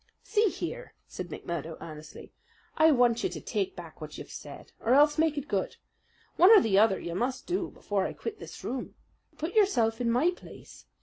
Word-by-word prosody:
"See 435 Hz, 0 st, +2 dB
here!" -, -, -6 dB
said -, -, -6 dB
McMurdo 165 Hz, -1 st, -5 dB
earnestly. 155 Hz, -1 st, -10 dB, 0.4 s
"I 315 Hz, +1 st, +6 dB
want 245 Hz, -4 st, +3 dB
you 380 Hz, -, +1 dB
to -, -, -6 dB
take 385 Hz, -1 st, -2 dB
back -, -, -11 dB
what -, -, -8 dB
you've -, -, -9 dB
said, -, -, -10 dB
or 240 Hz, +3 st, +2 dB
else 295 Hz, +1 st, +5 dB
make 315 Hz, -2 st, +2 dB
it 285 Hz, -, -4 dB
good. 195 Hz, -3 st, -2 dB, 0.6 s
One 360 Hz, -, +7 dB
or 440 Hz, -2 st, +10 dB
the 200 Hz, -, +3 dB
other 210 Hz, -2 st, +4 dB
you 170 Hz, -, -5 dB
must 245 Hz, +8 st, -2 dB
do 360 Hz, 0 st, -2 dB
before 200 Hz, -2 st, -2 dB
I -, -, -6 dB
quit 435 Hz, -2 st, -6 dB
this -, -, -10 dB
room. 255 Hz, 0 st, -5 dB, 0.4 s
Put 320 Hz, +4 st, -4 dB
yourself 245 Hz, -, +2 dB
in 235 Hz, -, +1 dB
my 255 Hz, +10 st, +3 dB
place. 360 Hz, -, -13 dB
260 Hz, 195 wpm, -29 LUFS, 220-355 Hz, 0.6 s, or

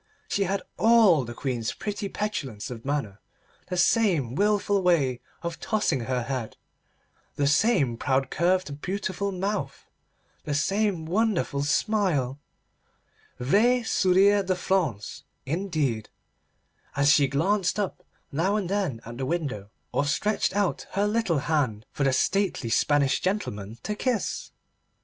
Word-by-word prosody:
She 200 Hz, -, 0 dB
had 195 Hz, +1 st, -1 dB, 0.2 s
all 215 Hz, -, +5 dB
the 120 Hz, 0 st, -8 dB
Queen's 120 Hz, -4 st, -2 dB
pretty 205 Hz, -1 st, -4 dB
petulance 135 Hz, -, -4 dB
of 115 Hz, -2 st, -7 dB
manner, 135 Hz, -8 st, -3 dB, 0.5 s
the 180 Hz, -, -3 dB
same 175 Hz, -, +2 dB
wilful 205 Hz, +3 st, +2 dB
way 145 Hz, -9 st, +2 dB, 0.2 s
of 170 Hz, -1 st, -4 dB
tossing 205 Hz, -, 0 dB
her 125 Hz, -1 st, -1 dB
head, 125 Hz, -3 st, -4 dB, 0.8 s
the 145 Hz, -, +1 dB
same 145 Hz, -, +3 dB
proud 130 Hz, +1 st, 0 dB
curved 170 Hz, -4 st, 0 dB
beautiful 195 Hz, +1 st, -2 dB
mouth, 190 Hz, -6 st, -3 dB, 0.6 s
the 145 Hz, -, -2 dB
same 195 Hz, +2 st, 0 dB
wonderful 185 Hz, -6 st, 0 dB
smile—vrai 150 Hz, -, 0 dB, 1.4 s
sourire 200 Hz, 0 st, +4 dB
de 185 Hz, 0 st, 0 dB
France 170 Hz, -, -1 dB, 0.2 s
indeed—as 145 Hz, -, -3 dB
she 145 Hz, -2 st, +5 dB
glanced 185 Hz, +8 st, +1 dB
up 200 Hz, -3 st, -2 dB, 0.3 s
now 170 Hz, +8 st, +1 dB
and 200 Hz, -5 st, -1 dB
then 185 Hz, -, -1 dB
at 120 Hz, +2 st, -8 dB
the 135 Hz, -, -1 dB
window, 140 Hz, -, -3 dB, 0.2 s
or 145 Hz, -, +1 dB
stretched 205 Hz, +7 st, 0 dB
out 200 Hz, -3 st, 0 dB
her 200 Hz, +1 st, +1 dB
little 210 Hz, -6 st, +1 dB
hand 130 Hz, -9 st, 0 dB
for 140 Hz, -, -2 dB
the 135 Hz, -, +3 dB
stately 185 Hz, -, 0 dB
Spanish 140 Hz, +1 st, +2 dB
gentlemen 115 Hz, -, -3 dB
to 210 Hz, -, -2 dB
kiss. 235 Hz, +1 st, -2 dB
165 Hz, 125 wpm, -26 LUFS, 135-200 Hz, 1.4 s, all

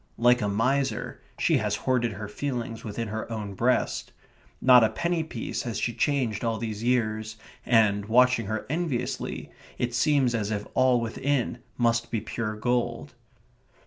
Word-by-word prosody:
Like 120 Hz, +1 st, +4 dB
a 105 Hz, -, 0 dB
miser, 125 Hz, +3 st, 0 dB, 0.2 s
she -, -, +3 dB
has -, -, 0 dB
hoarded 120 Hz, -3 st, 0 dB
her 105 Hz, +1 st, -6 dB
feelings 120 Hz, -1 st, -4 dB
within 110 Hz, 0 st, -4 dB
her 110 Hz, +2 st, -5 dB
own 105 Hz, -3 st, -4 dB
breast. 120 Hz, +6 st, 0 dB, 0.5 s
Not 125 Hz, -2 st, +7 dB
a 110 Hz, -, +4 dB
penny 170 Hz, -1 st, -1 dB
piece 125 Hz, -7 st, -4 dB
has 115 Hz, -3 st, -4 dB
she 120 Hz, -, -1 dB
changed 125 Hz, -8 st, 0 dB
all 115 Hz, -1 st, 0 dB
these 110 Hz, -2 st, -4 dB
years, 110 Hz, -3 st, 0 dB, 0.3 s
and, 105 Hz, -4 st, +3 dB
watching 125 Hz, -1 st, +4 dB
her 110 Hz, 0 st, -3 dB
enviously, 145 Hz, -5 st, -3 dB, 0.3 s
it 120 Hz, -1 st, -1 dB
seems 130 Hz, 0 st, +3 dB
as 105 Hz, -3 st, -1 dB
if 105 Hz, -1 st, -2 dB
all 130 Hz, -1 st, +4 dB
within 120 Hz, +2 st, -1 dB, 0.2 s
must 115 Hz, -1 st, +1 dB
be 115 Hz, -, -1 dB
pure 110 Hz, 0 st, -4 dB
gold. 120 Hz, +2 st, -1 dB
115 Hz, 155 wpm, -27 LUFS, 110-125 Hz, 0.5 s, Not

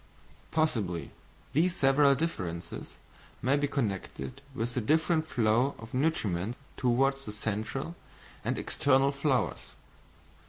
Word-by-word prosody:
Possibly 110 Hz, -, 0 dB, 0.4 s
these 170 Hz, +5 st, +3 dB
several 140 Hz, +1 st, +5 dB
differences 90 Hz, -, -4 dB, 0.5 s
may 135 Hz, +3 st, +4 dB
be 145 Hz, 0 st, +1 dB
connected 125 Hz, +1 st, -3 dB
with 120 Hz, +1 st, -2 dB
the 125 Hz, -, 0 dB
different 160 Hz, +5 st, +2 dB
flow 120 Hz, +1 st, +2 dB
of 115 Hz, 0 st, -11 dB
nutriment 115 Hz, -, 0 dB, 0.2 s
towards 135 Hz, +2 st, +2 dB
the -, -, -3 dB
central 110 Hz, +9 st, -3 dB, 0.5 s
and -, -, -1 dB
external 135 Hz, 0 st, +3 dB
flowers. 140 Hz, -2 st, -1 dB
135 Hz, 110 wpm, -30 LUFS, 110-145 Hz, 0.5 s, several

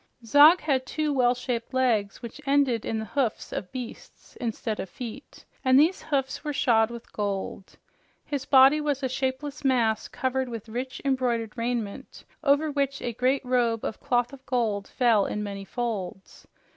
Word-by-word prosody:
Zog 295 Hz, +9 st, +7 dB
had 265 Hz, -4 st, 0 dB
two 305 Hz, 0 st, -1 dB
well 250 Hz, -2 st, +3 dB
shaped 245 Hz, 0 st, -4 dB
legs 230 Hz, -4 st, +1 dB
which 235 Hz, +5 st, -8 dB
ended 275 Hz, -5 st, +2 dB
in 225 Hz, -, -1 dB
the 220 Hz, -, -3 dB
hoofs 245 Hz, 0 st, -2 dB
of 185 Hz, -, -5 dB
beasts 250 Hz, -3 st, -9 dB
instead 225 Hz, -2 st, -3 dB
of 190 Hz, -, -4 dB
feet, 245 Hz, +2 st, -9 dB, 0.2 s
and 260 Hz, 0 st, +5 dB
these 325 Hz, +6 st, +3 dB
hoofs 270 Hz, -2 st, -2 dB
were 300 Hz, -1 st, -2 dB
shod 225 Hz, -5 st, +3 dB
with 235 Hz, 0 st, -10 dB
gold. 200 Hz, -2 st, -4 dB, 0.5 s
His 285 Hz, -3 st, -3 dB
body 270 Hz, +3 st, +6 dB
was 290 Hz, -2 st, -1 dB
a -, -, +2 dB
shapeless 265 Hz, +3 st, -3 dB
mass 235 Hz, -5 st, +2 dB
covered 260 Hz, 0 st, -2 dB
with 230 Hz, -2 st, -7 dB
richly 250 Hz, +4 st, -5 dB
embroidered 240 Hz, -5 st, 0 dB
raiment, 230 Hz, -3 st, -4 dB, 0.2 s
over 295 Hz, +1 st, +3 dB
which 280 Hz, -1 st, -1 dB
a 240 Hz, -, -2 dB
great 255 Hz, +4 st, +1 dB
robe 240 Hz, -3 st, +1 dB
of -, -, -4 dB
cloth 245 Hz, -2 st, 0 dB
of 270 Hz, -1 st, -12 dB
gold 215 Hz, -6 st, 0 dB
fell 230 Hz, -5 st, +2 dB
in 210 Hz, -, -3 dB
many 200 Hz, -1 st, -6 dB
folds. 200 Hz, -6 st, -5 dB
250 Hz, 170 wpm, -26 LUFS, 225-275 Hz, 0.5 s, Zog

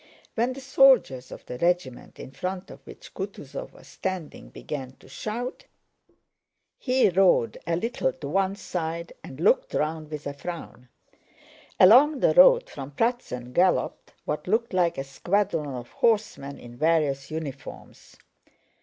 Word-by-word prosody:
When 240 Hz, +3 st, 0 dB
the 270 Hz, -, -9 dB
soldiers 260 Hz, -, +4 dB
of -, -, -10 dB
the 125 Hz, -, -7 dB
regiment 170 Hz, -7 st, -1 dB
in -, -, -9 dB
front 185 Hz, +6 st, -5 dB
of -, -, -11 dB
which -, -, -12 dB
Kutúzov -, -, -7 dB
was -, -, -17 dB
standing 185 Hz, -5 st, -5 dB
began 135 Hz, -3 st, -7 dB
to -, -, -20 dB
shout, 240 Hz, -, -5 dB, 1.1 s
he 255 Hz, -3 st, +3 dB
rode 175 Hz, -, +3 dB
a 170 Hz, -, +1 dB
little 200 Hz, -, -1 dB
to 145 Hz, -, -8 dB
one 195 Hz, +5 st, 0 dB
side 170 Hz, -4 st, -4 dB
and 130 Hz, -, -10 dB
looked 180 Hz, -, +2 dB
round 155 Hz, 0 st, -2 dB
with 150 Hz, -1 st, -7 dB
a 140 Hz, -, -3 dB
frown. 140 Hz, -5 st, -8 dB, 0.9 s
Along 265 Hz, +10 st, +7 dB
the -, -, +3 dB
road -, -, +7 dB
from 135 Hz, -1 st, -8 dB
Pratzen 140 Hz, -, -2 dB
galloped 180 Hz, +6 st, +1 dB
what -, -, -3 dB
looked 230 Hz, 0 st, 0 dB
like 175 Hz, -2 st, +2 dB
a 135 Hz, -, -2 dB
squadron 155 Hz, 0 st, -1 dB
of 120 Hz, -1 st, -8 dB
horsemen 210 Hz, -11 st, 0 dB
in 120 Hz, 0 st, -12 dB
various 150 Hz, -3 st, +1 dB
uniforms. 145 Hz, -4 st, -8 dB
170 Hz, 145 wpm, -26 LUFS, 140-220 Hz, 1.1 s, Along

